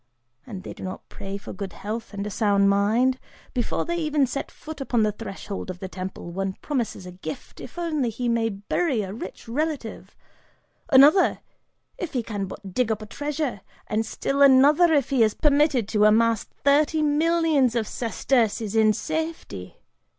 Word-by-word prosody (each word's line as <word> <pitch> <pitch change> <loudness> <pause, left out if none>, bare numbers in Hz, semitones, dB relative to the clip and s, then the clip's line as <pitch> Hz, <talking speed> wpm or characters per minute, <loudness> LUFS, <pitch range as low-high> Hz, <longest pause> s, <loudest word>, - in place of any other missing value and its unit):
And 195 -6 -7
they - - -7
do - - -13
not 185 0 -6
pray 195 0 -6
for 200 - -9
good 190 -1 -6
health 220 +3 -5
and 200 -1 -4
a 210 - -4
sound 200 -1 +3
mind; 230 +6 +2 0.3
before 245 - -1
they 345 0 -2
even 305 -4 +2
set 270 +2 -4
foot 310 -2 -9
upon 240 -4 +1
the 215 - +2
threshold 200 -2 -7
of 185 - -5
the 190 - -6
temple, 185 -2 -7
one 195 +1 -2
promises 235 -7 -3
a 180 - -8
gift 175 -3 -8
if - - -10
only 310 -8 0
he 240 +2 -3
may 230 -1 +1
bury 220 - -1
a 190 0 -6
rich 230 - -8
relative; 285 -1 -3 0.7
another, 295 +6 +6 0.6
if 350 - -4
he 250 -3 0
can 205 -3 -4
but 190 0 -9
dig 240 +1 +1
up 215 0 -2
a - - -7
treasure, 290 -2 -3 0.2
and 215 +1 0
still 275 +5 -2
another, 280 +5 +6
if 280 -3 +2
he 265 -3 +3
is 215 -2 +3
permitted 285 -6 +3
to 210 -1 +3
amass 225 0 +4 0.2
thirty 300 +2 +3
millions 305 -4 +2
of 225 -3 0
sesterces 225 -3 0
in 215 -1 +5
safety! 315 - -4
230 Hz, 175 wpm, -24 LUFS, 205-290 Hz, 0.7 s, another